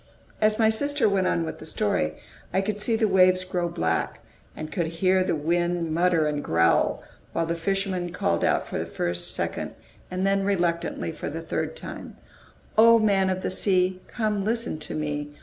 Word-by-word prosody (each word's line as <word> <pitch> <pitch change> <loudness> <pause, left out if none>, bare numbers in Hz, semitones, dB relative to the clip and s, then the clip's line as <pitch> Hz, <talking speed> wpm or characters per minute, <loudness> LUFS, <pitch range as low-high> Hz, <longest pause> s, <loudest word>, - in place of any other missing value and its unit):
As 215 0 +3
my 220 -1 +4
sister 285 +5 +1
went 195 -2 +2
on 85 -1 +1
with 80 - -6
the - - -10
story, 75 0 0 0.4
I 190 - +2
could 205 +1 -3
see 225 +2 +1
the 220 -1 +2
waves 185 -1 +4
grow 180 -2 -2
black, 80 - -1 0.4
and 155 0 -6
could 175 -4 -1
hear 185 +3 +2
the 175 - 0
wind 170 +1 0
mutter 170 -1 +3
and 150 -1 -1
growl, 85 0 +2 0.3
while 165 - 0
the 165 - -1
fisherman 185 0 -1
called 85 - 0 0.2
for - - -4
the - - -3
first, 85 0 -2
second, - - -3 0.3
and 185 +1 -2
then 195 0 +2
reluctantly, 175 -4 -1
for - - -5
the - - -6
third - - -3
time: - - -8 0.6
"O 230 +1 +8
Man 200 -4 +3
of 185 0 -2
the - - -1
Sea, 185 -1 +1
Come 215 -4 -1
listen 230 -5 -1
to 150 - -7
me! 150 -1 -3
185 Hz, 185 wpm, -25 LUFS, 160-200 Hz, 0.6 s, O